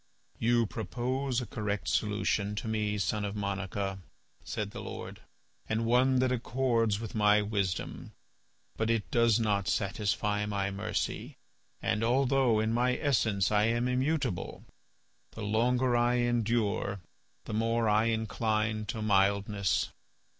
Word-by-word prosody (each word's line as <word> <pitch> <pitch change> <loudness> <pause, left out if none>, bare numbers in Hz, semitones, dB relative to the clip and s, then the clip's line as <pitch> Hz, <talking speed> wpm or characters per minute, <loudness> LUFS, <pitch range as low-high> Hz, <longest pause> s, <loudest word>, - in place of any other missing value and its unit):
"You 120 0 +3
propose 125 +5 -2
a - - -4
correct 105 -2 -3
solution 105 -1 0
to 105 - -4
me, 105 -1 -1
son 105 +2 -1
of 100 0 -3
Monica," 100 -1 -3 0.4
said 105 -1 -4
the - - -7
Lord, - - -7 0.5
"and 110 +1 0
one 125 +3 +4
that 130 0 +2
accords 115 -4 +1
with 115 -1 -6
my 105 -1 +4
wisdom. 100 -4 -3 0.7
But 110 0 0
it 115 -2 0
does 115 -2 +4
not 100 -4 0
satisfy 105 +2 0
my 100 -1 -1
mercy. 105 +3 -3 0.5
And, 115 -1 0
although 130 -1 +3
in 110 +1 0
my 125 +2 +2
essence 110 -8 +1
I 105 0 +4
am 120 +2 +1
immutable, 130 - -1 0.7
the 110 - -7
longer 120 +4 +2
I 120 +1 +3
endure, 115 -4 0 0.5
the - - -6
more 115 +1 +1
I 105 +1 +3
incline 110 -1 -1
to 110 -3 -3
mildness. 100 0 +1
110 Hz, 130 wpm, -30 LUFS, 105-120 Hz, 0.7 s, one